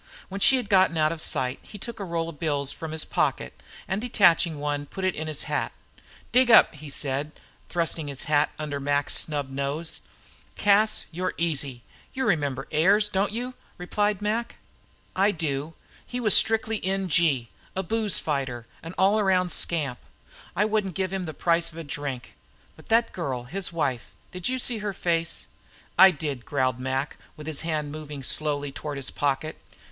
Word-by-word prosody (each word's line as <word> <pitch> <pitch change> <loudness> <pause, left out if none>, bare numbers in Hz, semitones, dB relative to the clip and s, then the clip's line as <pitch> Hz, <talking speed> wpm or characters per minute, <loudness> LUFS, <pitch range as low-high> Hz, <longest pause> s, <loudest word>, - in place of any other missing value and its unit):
When 195 +1 -6
she 265 - +7
had 245 - -3
gotten 190 -4 +4
out 155 0 +3
of 165 -1 -4
sight 130 -3 0
he 210 - -11
took 230 +3 -7
a - - -3
roll 170 -3 -2
of 150 -4 -11
bills 145 -4 0
from 160 -1 -7
his 160 0 -1
pocket, - - -1 0.3
and 190 +2 -1
detaching 175 -8 +4
one, 145 0 -2
put 190 +4 -4
it 185 - +2
in 155 +1 -5
his 155 -2 -2
hat. - - -2 0.6
"Dig 255 0 +4
up," 225 - +8
he 150 -1 -10
said, 140 +1 -1 0.4
thrusting 165 -3 0
the 140 - -5
hat 150 -1 +3
under 150 -2 -4
Mac's 145 0 0
snub 145 -3 0
nose. 140 +4 -3 0.6
"Cas, 210 +1 +3
you're 180 +2 -3
easy. 140 -7 -1 0.3
You 265 - -1
remember 145 - 0
Ayers, 200 +7 +4
don't 195 +1 0
you?" 245 +3 -4 0.2
replied 205 +3 -1
Mac. 225 +3 -1 0.6
"I 195 +2 +4
do. 160 -4 -2 0.3
He 250 - -5
was 215 -4 +7
strictly 225 -1 +3
N.G., 170 - +1 0.2
a 190 - -1
booze 215 +1 +1
fighter, 130 -6 -2 0.2
an 165 +2 -8
all 200 +3 +4
around 185 -3 +2
scamp. 150 -7 0 0.6
I 205 - +3
wouldn't 210 -5 -1
give 190 -1 -1
him 190 -2 -2
the 155 - -5
price 170 -1 +2
of 160 - -13
a 165 - -5
drink. 140 -3 -5 0.4
But - - -17
that 230 +1 +3
girl, 135 -8 -3
his 180 +9 0
wife 140 -8 -2 0.2
did 180 +4 -2
you 260 - 0
see 240 -3 0
her 210 -1 -3
face?" 170 -2 -1 0.5
"I 190 +2 +9
did," 145 -7 -4
growled 130 -5 0
Mac, 130 +2 -2 0.2
with 150 - -9
his 155 -2 -2
hand 155 -3 -2
moving 150 -2 -7
slowly 145 0 -1
toward 145 +1 -6
his 135 - -2
pocket. 145 +2 -2
165 Hz, 180 wpm, -26 LUFS, 145-195 Hz, 0.6 s, I